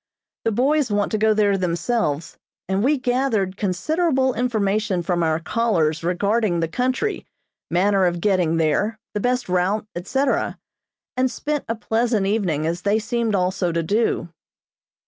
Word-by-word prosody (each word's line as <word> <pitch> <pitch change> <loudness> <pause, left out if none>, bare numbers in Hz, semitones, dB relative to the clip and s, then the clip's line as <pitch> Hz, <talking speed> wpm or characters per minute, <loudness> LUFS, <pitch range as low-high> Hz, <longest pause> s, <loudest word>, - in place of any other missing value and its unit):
The 225 - +2
boys 270 +4 +2
want 205 -1 0
to 215 - 0
go 220 +1 +4
there 205 -2 +3
themselves, 170 -2 -1 0.3
and 190 +2 0
we 290 +4 +3
gathered 245 -7 0
considerable 265 - 0
information 215 -6 0
from 175 0 0
our 160 -1 +1
callers 165 -5 0
regarding 200 +2 +1
the 165 - 0
country, 255 - -1 0.4
manner 190 +2 +3
of 175 0 -1
getting 180 -4 +1
there, 165 +8 +1 0.2
the 210 - -1
best 250 +3 0
route, 185 +4 0
etc., 265 +10 0 0.6
and 255 +1 +2
spent 295 +3 -3
a 230 - -1
pleasant 225 -1 0
evening, 190 -7 0
as 170 +2 -2
they 205 +2 +2
seemed 230 -1 -1
also 180 -1 0
to 165 0 -1
do. 205 -1 0
205 Hz, 145 wpm, -22 LUFS, 180-240 Hz, 0.6 s, go